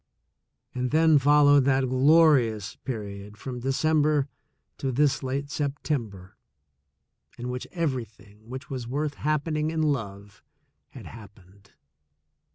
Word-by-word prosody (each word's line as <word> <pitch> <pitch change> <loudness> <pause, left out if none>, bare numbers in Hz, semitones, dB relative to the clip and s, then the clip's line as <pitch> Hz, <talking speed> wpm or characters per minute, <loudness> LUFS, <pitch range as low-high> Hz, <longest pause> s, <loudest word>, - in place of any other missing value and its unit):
And 125 0 -2
then 155 0 +4
followed 145 0 +5
that 135 -1 +2
glorious 130 - +3
period 105 -3 -7
from 125 +3 -6
De 125 - -6
cember 150 0 +2 0.5
to 135 - -2
this 140 +1 +1
late 140 +1 -3
September, 125 - -4 1.0
in 120 +1 -5
which 125 0 -5
everything 115 - -5
which 130 +3 -7
was 130 -4 -6
worth 145 +4 -2
happening 155 +1 -1
in 160 -1 -1
love 100 -9 -3 0.5
had - - -12
happened. 100 -3 -15
130 Hz, 115 wpm, -26 LUFS, 110-150 Hz, 1.0 s, followed